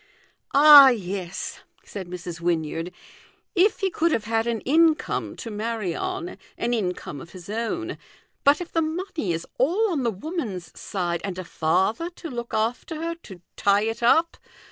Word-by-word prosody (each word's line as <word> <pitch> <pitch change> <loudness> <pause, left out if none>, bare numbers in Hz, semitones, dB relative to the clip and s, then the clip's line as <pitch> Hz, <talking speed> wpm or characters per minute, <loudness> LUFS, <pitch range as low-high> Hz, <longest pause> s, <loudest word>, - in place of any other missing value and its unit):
" - - -48
Ah, 285 -1 +10
yes," 190 -6 -4 0.3
said 195 -3 -7
Mrs. 175 -1 -7
Wynyard, 165 0 -1 0.4
" - - -36
if 435 +2 -1
he 385 -1 +1
could 335 0 +1
have 225 - 0
had 225 +1 0
an 230 -2 -1
income 320 +2 +2
to 230 - -7
rnarry 215 -3 -3
on 370 -1 -4 0.2
an 240 +1 -1
income 180 - -3
of 170 - -13
his 185 +1 -9
own; 235 +11 -3 0.4
but 285 +1 +5
if 350 -1 -7
the 330 - +1
money 315 - -2
is 165 0 -3
all 370 - +2
on 305 -5 0
the 240 - +1
woman's 205 - -5
side, 175 -3 -3
and 190 -2 -4
a 185 - -4
father 190 - 0
to 330 - -8
look 235 -1 -5
after 230 +8 -1
her, 335 +1 -2
to 190 - -13 0.2
tie 200 +1 +3
it 225 +1 -3
up. 320 +8 +3
230 Hz, 175 wpm, -24 LUFS, -, 0.4 s, Ah